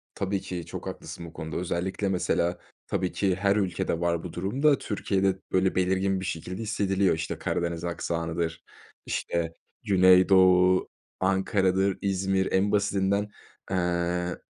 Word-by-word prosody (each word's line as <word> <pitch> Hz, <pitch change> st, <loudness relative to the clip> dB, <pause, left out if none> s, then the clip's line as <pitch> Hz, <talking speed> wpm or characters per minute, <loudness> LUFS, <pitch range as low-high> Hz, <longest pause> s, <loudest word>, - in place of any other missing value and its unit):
Tabii 100 Hz, 0 st, -1 dB
ki 90 Hz, -2 st, -5 dB
çok -, -, -7 dB
haklısın 85 Hz, -, -7 dB
bu 80 Hz, -, -11 dB
konuda, 80 Hz, -2 st, -5 dB
özellikle 90 Hz, +3 st, -2 dB
mesela, 90 Hz, -1 st, 0 dB, 0.3 s
tabii 90 Hz, -1 st, -1 dB
ki 95 Hz, -3 st, +1 dB
her 100 Hz, +1 st, +2 dB
ülkede 95 Hz, -4 st, -1 dB
var. 85 Hz, -1 st, 0 dB
Bu 90 Hz, -, -7 dB
durumda 135 Hz, +11 st, +2 dB
Türkiye'de 95 Hz, -3 st, -1 dB
böyle 95 Hz, 0 st, +2 dB
belirgin 95 Hz, +1 st, +1 dB
bir 95 Hz, -, -5 dB
şekilde 90 Hz, +5 st, -4 dB
hissediliyor, 100 Hz, -4 st, +1 dB
işte, 80 Hz, 0 st, -4 dB
Karadeniz 85 Hz, -1 st, -2 dB
aksanıdır, 85 Hz, -1 st, -3 dB, 0.4 s
işte, 85 Hz, -1 st, -2 dB, 0.3 s
Güneydoğu, 95 Hz, -1 st, +5 dB, 0.3 s
Ankara'dır, 95 Hz, 0 st, +1 dB
İzmir, 95 Hz, -1 st, 0 dB
en 100 Hz, +2 st, +2 dB
basitinden, 100 Hz, 0 st, +1 dB, 0.4 s
eee, 90 Hz, -1 st, 0 dB
95 Hz, 130 wpm, -27 LUFS, 85-95 Hz, 0.4 s, Güneydoğu